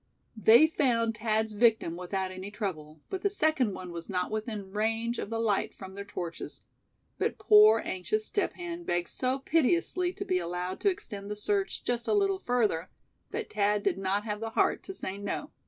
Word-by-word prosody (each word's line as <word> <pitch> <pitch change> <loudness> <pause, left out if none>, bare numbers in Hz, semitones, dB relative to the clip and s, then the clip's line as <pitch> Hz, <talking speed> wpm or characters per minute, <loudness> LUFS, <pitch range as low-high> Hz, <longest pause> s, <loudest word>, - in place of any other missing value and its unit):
They 225 +6 +7
found 230 -8 +1
Thad's 220 -1 0
victim 220 -6 +3
without 185 +1 -3
any 185 +1 -7
trouble, 160 -8 -5
but 380 - -3
the 405 - +2
second 310 - +1
one 180 -1 -7
was 170 -1 -7
not 180 0 -1
within 215 -3 -4
range 225 +3 -1
of - - -4
the 225 - -2
light 220 -3 0
from 190 -1 -9
their 200 +1 -6
torches. 175 -4 -7 0.6
But - - 0
poor 425 0 +7
anxious 430 - -2
Step 410 - 0
Hen 345 -1 -6
begged 175 - -1
so 255 +1 -1
piteously 340 +5 +1
to - - -5
be 185 - +1
allowed 180 +2 -3
to 405 - +3
extend 205 - -5
the 210 - -3
search 395 - -1
"just 240 -1 -1
a - - +3
little 390 -2 +2
further," 215 - 0 0.4
that 460 - -5
Thad 205 0 +2
did - - +1
not 195 +2 0
have 210 -1 -3
the 225 0 -3
heart - - +2
to 385 - -6
say 195 - -5
no. 205 - -4
215 Hz, 190 wpm, -29 LUFS, 190-290 Hz, 0.6 s, They